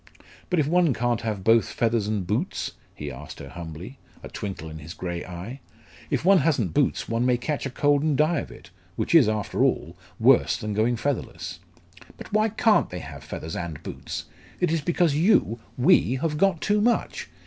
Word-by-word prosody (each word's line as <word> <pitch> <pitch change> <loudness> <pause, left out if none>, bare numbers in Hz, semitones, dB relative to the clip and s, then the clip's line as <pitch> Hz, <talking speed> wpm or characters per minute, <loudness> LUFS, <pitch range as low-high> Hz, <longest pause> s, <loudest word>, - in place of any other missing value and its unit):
"But 180 - +1
if 155 - +3
one 170 -4 +3
can't 120 -1 0
have 105 -4 -3
both 115 +2 +4
feathers 115 -3 0
and 105 -3 -1
boots?" 115 - -2 0.2
he 75 -1 -6
asked 70 +3 -9
her 70 - -9
humbly, 85 - -8 0.2
a - - -7
twinkle 95 -5 -6
in 80 0 -8
his 80 +3 -9
grey 85 -1 -4
eye. 90 +9 -7 0.5
"If - - -1
one 195 0 +7
hasn't 130 - +1
boots, - - +1
one 115 +1 0
may 125 -1 +3
catch 140 +3 -2
a - - -5
cold 145 +2 +2
and 150 -2 +1
die 155 +1 +3
of - - -6
it - - -14 0.2
which - - -2
is, - - +7
after 105 -3 0
all, - - 0 0.2
worse - - +5
than 105 -1 -4
going 110 +4 +2
featherless." 135 +3 -3 0.6
"But - - -11
why 215 +1 +3
can't 220 +1 +3
they 90 - -6
have 70 -4 -8
feathers 80 +1 -6
and 85 -4 -5
boots? - - -6 0.3
It 180 -3 +1
is 165 -1 +1
because 170 -1 +2
you 155 - +3 0.2
we 130 -1 +4
have 150 +3 -1
got 180 0 +2
too 210 0 +2
much. 235 +2 0
120 Hz, 195 wpm, -25 LUFS, -, 0.6 s, one